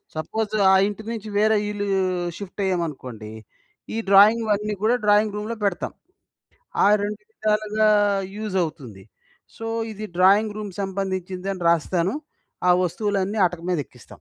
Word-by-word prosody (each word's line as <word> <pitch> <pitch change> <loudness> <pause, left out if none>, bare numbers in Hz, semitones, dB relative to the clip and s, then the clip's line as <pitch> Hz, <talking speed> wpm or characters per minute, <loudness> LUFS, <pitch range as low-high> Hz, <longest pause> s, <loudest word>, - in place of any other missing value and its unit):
Suppose 215 +7 -3 0.2
ఆ - - +6
ఇంటి 210 +1 -6
నుంచి 220 -2 -6
వేరే 215 +1 +4
ఇల్లు 205 0 -3 0.5
షిఫ్టయ్యామనుకోండి, 165 - -4 0.6
ఈ - - -2
డ్రాయింగ్ 210 +4 +7
వన్నీ 210 +1 0
గూడా 235 +3 +4
డ్రాయింగ్ 210 0 +3
రూమ్‌లో 220 +2 -4
పెడతాం. 190 -4 -1 0.9
ఆ - - +6 0.2
2 210 +1 -3
విధాలుగా 215 0 +1 0.5
యూజవుతుంది. 160 - -3 0.5
సో, 225 - -6 0.3
ఇది 215 +1 -6
డ్రాయింగ్ 205 +3 +4
రూమ్ 210 -2 -5
సంబంధించిందని 190 -1 -3
రాస్తాను, 170 +3 +1 0.6
ఆ - - +8
వస్తువులన్నీ 200 +3 -1
అటక 175 -1 -10
మీదెక్కిస్తాం. 140 -7 -5
200 Hz, 120 wpm, -23 LUFS, 180-215 Hz, 0.9 s, ఆ